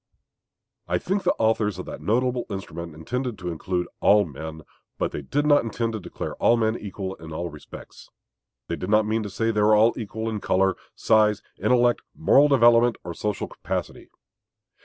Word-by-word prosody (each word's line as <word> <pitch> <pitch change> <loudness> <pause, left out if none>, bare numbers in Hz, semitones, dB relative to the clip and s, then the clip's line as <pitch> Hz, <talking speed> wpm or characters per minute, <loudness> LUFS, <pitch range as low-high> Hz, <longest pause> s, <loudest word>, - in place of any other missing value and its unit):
I 90 +1 +1
think 195 - -1
the - - +1
authors 110 -3 +1
of 90 - -6
that - - -8
notable 125 +2 0
instrument 85 -5 -6
intended 125 +8 -4
to 90 -2 -5
include 90 +2 -2
all 105 0 +5
men; 80 +1 -8 0.3
but - - -1
they - - -5
did 145 - -1
not 145 -1 +5
intend 115 0 -2
to 110 - -3
declare - - -6
all 120 - +4
men 110 -1 +1
equal 95 -3 -5
in 80 0 -11
all 85 +2 -4
respects. - - -12 0.6
They 85 - -2
did 90 - -5
not 105 0 +4
mean 110 +1 0
to 105 - -5
say 115 +4 0
all 105 +1 +4
were - - -9
equal 110 0 -5
in 110 -2 -2
color, 95 0 +2 0.2
size, 105 -2 +3 0.2
intellect, 120 +3 +3
moral 150 -2 +5
development, 120 -3 +5
or 85 - -6
social 105 +3 -3
capacity. - - -5
105 Hz, 180 wpm, -24 LUFS, 90-115 Hz, 0.6 s, all